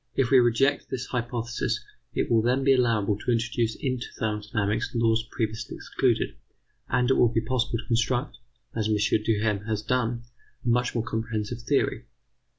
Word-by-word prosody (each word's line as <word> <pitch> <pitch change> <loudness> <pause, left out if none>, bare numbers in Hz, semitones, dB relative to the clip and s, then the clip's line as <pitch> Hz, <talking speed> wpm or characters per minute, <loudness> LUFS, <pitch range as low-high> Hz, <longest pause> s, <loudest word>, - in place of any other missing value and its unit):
If 135 -2 +1
we 135 - +8
reject 120 +3 +2
this 125 -1 -3
hypothesis, 120 -1 -2 0.4
it - - 0
will 115 -1 +5
then 125 +4 +1
be 135 0 +5
allowable 110 -5 +2
to 120 - -1
introduce 115 -1 0
into 130 -3 -2
thermodynamics 105 0 -1
laws 115 -1 +2
previously 110 -3 -3
excluded, - - 0 0.5
and 125 +2 +2
it - - +4
will 120 - +5
be 115 - +1
possible 120 0 0
to 115 - -7
construct, 120 +3 0 0.3
as 110 -2 -1
M. 110 - +3 0.3
Duhem 105 -2 0
has 110 -1 -2
done, 120 0 0 0.4
a - - +1
much 120 +1 +1
more 115 - +1
comprehensive 110 0 -3
theory. 140 +4 0
115 Hz, 160 wpm, -26 LUFS, 110-125 Hz, 0.5 s, we